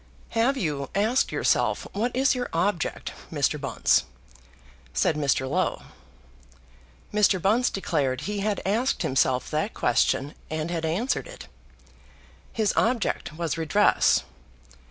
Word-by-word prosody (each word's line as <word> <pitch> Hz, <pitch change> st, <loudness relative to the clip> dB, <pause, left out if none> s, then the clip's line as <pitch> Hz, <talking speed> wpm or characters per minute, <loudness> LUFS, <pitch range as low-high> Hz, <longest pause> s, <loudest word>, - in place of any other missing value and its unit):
"Have 240 Hz, +4 st, +1 dB
you 145 Hz, -, -2 dB
asked 220 Hz, +6 st, +2 dB
yourself -, -, +1 dB
what 235 Hz, +5 st, -1 dB
is 270 Hz, +3 st, +3 dB
your 250 Hz, -1 st, -3 dB
object, 170 Hz, 0 st, -1 dB, 0.2 s
Mr. -, -, 0 dB
Bunce?" -, -, +2 dB, 0.9 s
said 75 Hz, -, +2 dB
Mr. 140 Hz, -3 st, +1 dB
Low. 180 Hz, +7 st, -1 dB, 1.3 s
Mr. 205 Hz, -2 st, +3 dB
Bunce 220 Hz, +7 st, +2 dB
declared 140 Hz, -9 st, -1 dB
he 210 Hz, 0 st, -3 dB
had 205 Hz, 0 st, -1 dB
asked 225 Hz, +7 st, 0 dB
himself 130 Hz, -1 st, +1 dB
that 155 Hz, +8 st, -1 dB
question, 135 Hz, +4 st, +1 dB, 0.2 s
and 155 Hz, +1 st, -3 dB
had 165 Hz, -2 st, -2 dB
answered 210 Hz, -, -1 dB
it. -, -, -11 dB, 1.0 s
His 215 Hz, -3 st, 0 dB
object 230 Hz, -8 st, 0 dB
was 165 Hz, -2 st, -2 dB
redress. 165 Hz, +6 st, +3 dB
190 Hz, 120 wpm, -26 LUFS, 155-225 Hz, 1.3 s, is